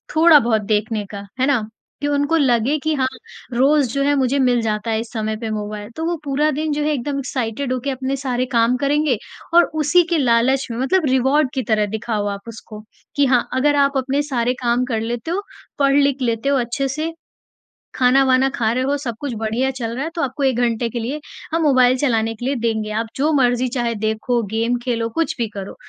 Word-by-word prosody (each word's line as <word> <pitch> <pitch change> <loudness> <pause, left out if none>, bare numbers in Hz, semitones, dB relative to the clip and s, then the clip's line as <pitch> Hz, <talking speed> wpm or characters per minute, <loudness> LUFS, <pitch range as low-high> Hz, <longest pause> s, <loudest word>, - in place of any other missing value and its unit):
थोड़ा 320 -1 +7
बहुत 225 -4 +1
देखने 210 +1 -1
का, 200 -1 -7
है 260 - +3
ना? 245 -7 +1 0.3
कि 290 - 0
उनको 285 +2 +1
लगे 260 0 +2
कि 315 0 +1
हाँ, 260 -2 +1 0.5
रोज़ 275 +3 +3
जो 275 - 0
है 285 +1 +2
मुझे 270 0 +1
मिल 250 -2 +3
जाता 215 0 -2
है 220 - 0
इस 225 0 -7
समय 220 -1 -2
पे 225 - -3
मोबाइल। 210 0 -5
तो 320 - -3
वो 345 +1 0
पूरा 290 +1 +1
दिन 305 +2 -2
जो 295 - -1
है 305 - +1
एकदम 280 +1 -2
एक्साइटेड 255 0 -3
हो 255 - -1
के 280 - -2
अपने 265 +1 -2
सारे 255 -2 -1
काम 235 0 +3
करेंगे 285 -1 +1 0.4
और 345 +1 +7 0.2
उसी 350 +5 +4
के 340 - +2
लालच 260 +1 +2
में 230 - -4
मतलब 315 +7 +1
रिवार्ड 265 +2 +2
की 260 - -1
तरह 210 -1 +3
दिखाओ 220 -2 -2
आप 200 0 -5
उसको। 215 -1 -10 0.3
कि 285 - +3
हाँ, 250 -2 +2
अगर 290 +3 +2
आप 280 -1 +2
अपने 270 +2 0
सारे 250 -4 0
काम 240 +1 +2
कर 230 -3 -2
लेते 235 +7 -4
हो 380 +3 -1 0.4
पढ़-लिख 280 -1 +3
लेते 235 +2 0
हो 280 - +3
अच्छे 255 +3 -1
से, 310 +5 -3 0.8
खाना-वाना 260 +1 +4
खा 225 -2 +1
रहे 255 +1 0
हो 280 +2 +1
सब 265 -4 -4
कुछ 285 -4 -4
बढ़िया 225 +4 0
चल 240 -3 -4
रहा 265 - -2
है 320 - -3
तो 335 - -1
आपको 275 +1 -2
एक 260 -3 +2
घंटे 235 -1 +1
के 235 - -4
लिए 255 +7 -3 0.3
हम 330 - +1
मोबाइल 255 -4 +4
चलाने 225 -5 +1
के 240 - -7
लिए 275 +2 0
देंगे। 225 -3 -1
आप 230 - -6
जो 295 +4 +1
मर्ज़ी 250 -2 +2
चाहे 240 -2 0
देखो 220 +3 -1
गेम 230 +2 0
खेलो 230 -2 -1
कुछ 320 +5 -1
भी 235 -2 -1
करो। 195 -1 -7
255 Hz, 220 wpm, -20 LUFS, 230-280 Hz, 0.8 s, थोड़ा